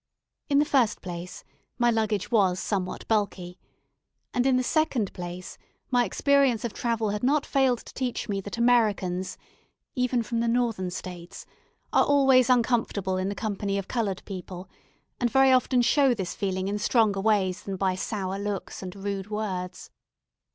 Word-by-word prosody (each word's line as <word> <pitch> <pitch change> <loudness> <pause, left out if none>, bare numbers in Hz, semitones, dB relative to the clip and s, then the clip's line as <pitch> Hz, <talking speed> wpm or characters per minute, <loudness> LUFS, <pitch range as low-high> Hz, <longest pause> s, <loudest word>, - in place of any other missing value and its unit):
In 280 - +3
the 295 - +4
first 260 -7 +1
place, 175 0 -7 0.3
my 240 -1 +3
luggage 220 -2 -1
was 190 -5 +3
somewhat 185 -3 -3
bulky; 195 -5 -1 0.7
and, 250 +1 +2
in 260 -1 +4
the 255 - +1
second 260 - 0
place, 175 0 -7 0.3
my 245 -1 +3
experience 270 +1 +2
of 235 - -4
travel 225 -3 -1
had 210 0 -3
not 285 +3 +2
failed 265 -3 +2
to - - -12
teach 255 -2 -3
me 200 -2 -2
that 205 +4 -7
Americans 210 -6 +1 0.6
(even 250 -2 0
from 230 +1 -2
the 235 - 0
Northern 230 -6 0
States) 180 -1 -8 0.5
are - - +5
always 270 -3 +4
uncomfortable 225 -6 +1
in 185 +1 -1
the 200 - -4
company 200 -2 -2
of 195 - -4
coloured 210 -6 -2
people, 185 -1 -7 0.5
and 240 - +1
very 265 +2 +5
often 255 -1 +3
show 270 0 +4
this 190 -5 -4
feeling 190 -2 -2
in 205 +1 -2
stronger 210 -4 +2
ways 200 -2 +1
than 195 - -5
by 190 0 0
sour 195 0 -3
looks 200 -2 -4
and 185 0 -7
rude 200 0 -4
words. 195 -4 -4
210 Hz, 165 wpm, -26 LUFS, 190-245 Hz, 0.7 s, are